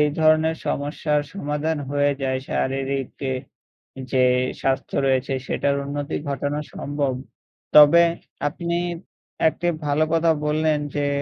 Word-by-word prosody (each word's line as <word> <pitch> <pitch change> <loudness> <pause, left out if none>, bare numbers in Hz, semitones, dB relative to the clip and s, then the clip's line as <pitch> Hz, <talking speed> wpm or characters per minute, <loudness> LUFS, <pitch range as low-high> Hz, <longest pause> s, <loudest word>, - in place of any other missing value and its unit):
এই 150 - +4
ধরনের 155 +1 +4
সমস্যার 150 +1 0
সমাধান 150 -2 -2
হয়ে 145 0 +2
যায় 130 -1 0
শারীরিকে 135 0 -2 0.8
যে 130 -1 +3 0.4
স্বাস্থ্য 135 0 -1
রয়েছে 135 0 +1
সেটার 140 0 0
উন্নতি 145 0 -3
ঘটানো 145 +1 -2
সম্ভব। 145 -2 -2 0.6
তবে 150 +3 +9 0.4
আপনি 170 +2 -2 0.7
একটি 175 - -4 0.2
ভালো 150 +2 +2
কথা 165 0 +4
বললেন 155 0 +1 0.2
যে, 145 -1 +1
145 Hz, 110 wpm, -23 LUFS, 140-155 Hz, 0.8 s, তবে